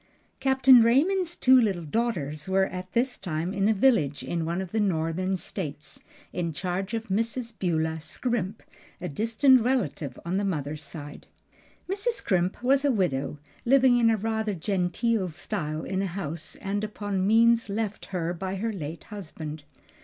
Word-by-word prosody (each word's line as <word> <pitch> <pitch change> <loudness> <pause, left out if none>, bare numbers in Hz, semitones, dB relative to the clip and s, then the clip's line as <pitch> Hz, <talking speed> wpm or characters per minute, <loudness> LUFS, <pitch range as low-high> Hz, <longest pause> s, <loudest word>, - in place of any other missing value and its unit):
_ - - -39
Captain 265 -2 +6
Raymond's 335 +10 +3
two 260 0 +6
little 190 -7 0
daughters 155 -7 -2
were 190 0 +3
at 185 0 -7
this 245 +2 0
time 175 0 -3
in 200 +1 +2
a - - +5
village 190 - +2
in 165 +5 -2
one 170 +2 -1
of 190 -2 -5
the 220 - 0
Northern 185 0 0
States, 155 - -6 0.3
in 170 -2 -2
charge 190 +6 -3
of 225 -1 -5
Mrs. 230 +4 -1
Beulah 160 -3 0
Scrimp, 215 +3 -3 0.4
a 180 - -4
distant 230 - +4
relative 230 - -1
on 180 +2 -1
the 200 - 0
mother's 155 -5 -3
side. 145 0 -9 0.6
Mrs. 400 +6 0
Scrimp 185 - -1
was 270 +2 +3
a 285 - +3
widow 150 - 0 0.3
living 255 -1 +5
in 230 - +4
rather 220 -1 -1
genteel 190 +3 0
style 155 -2 -4
in 190 0 -2
a 195 - -1
house 170 -3 -5
and 205 +1 -3
upon 205 -3 -2
means 230 +1 +4
left 210 0 -3
her 175 -2 -2
by 190 +2 -4
her 220 +3 -2
late 160 -3 -6
husband. 160 -7 -8
195 Hz, 160 wpm, -27 LUFS, 165-230 Hz, 0.6 s, Captain